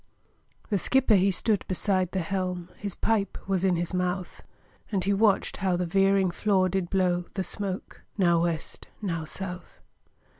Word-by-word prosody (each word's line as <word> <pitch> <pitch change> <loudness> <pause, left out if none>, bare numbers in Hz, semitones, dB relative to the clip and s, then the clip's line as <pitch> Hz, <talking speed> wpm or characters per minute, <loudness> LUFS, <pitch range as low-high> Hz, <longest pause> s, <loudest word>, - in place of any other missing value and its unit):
The 200 - +2
skipper 260 +3 +3
he 195 0 +5
stood 205 +2 +1
beside 185 -1 0
the 190 - -1
helm, 180 0 -3
His 200 -2 -5
pipe 215 -3 0
was 190 -2 0
in 185 -2 +3
his 175 +1 -2
mouth, 180 0 -2 0.5
And 195 -3 0
he 200 - +2
watched 200 0 +2
how 190 -2 +1
the 180 - -1
veering 195 +1 +3
flaw 190 -1 +2
did 185 -1 -1
blow 180 -2 +1
The 190 - -1
smoke 195 0 -4 0.2
now 170 -4 +3
West, 165 -2 -3
now 165 -6 -3
South. 180 +2 -7
185 Hz, 160 wpm, -27 LUFS, 180-195 Hz, 0.5 s, he